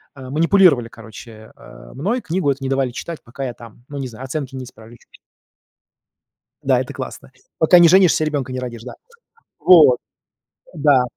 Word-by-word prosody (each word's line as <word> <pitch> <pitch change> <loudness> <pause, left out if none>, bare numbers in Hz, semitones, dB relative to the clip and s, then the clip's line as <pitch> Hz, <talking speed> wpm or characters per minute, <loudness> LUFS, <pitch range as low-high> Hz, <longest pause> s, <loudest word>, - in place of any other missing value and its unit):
э, 130 -2 -10
манипулировали, 160 -5 +3
короче, 110 0 -13
э, - - -15
мной. 200 - -2
Книгу 175 -5 -2
эту 135 0 -5
не 135 - -3
давали 135 -2 0
читать, 165 +6 -7
пока 135 +4 -7
я 125 - -5
там 115 0 -15
ну, 145 - -8
не 135 - -4
знаю, 120 +1 -11
оценки 135 -1 -5
не 130 - -6
исправлю, 115 -2 -15
или - - -15
ещё - - -27
что-то. - - -18 1.5
Да, - - +2
это - - -6
классно. - - -8 0.3
Пока 175 +3 +5
не 170 - +7
женишься, 180 -3 +4
ребенка 145 -4 -3
не 130 - -4
родишь, 120 -3 -7
да. 130 - -9 0.6
Вот. 155 -9 +6 0.8
Да. 145 -4 +3
135 Hz, 185 wpm, -19 LUFS, 120-155 Hz, 1.5 s, не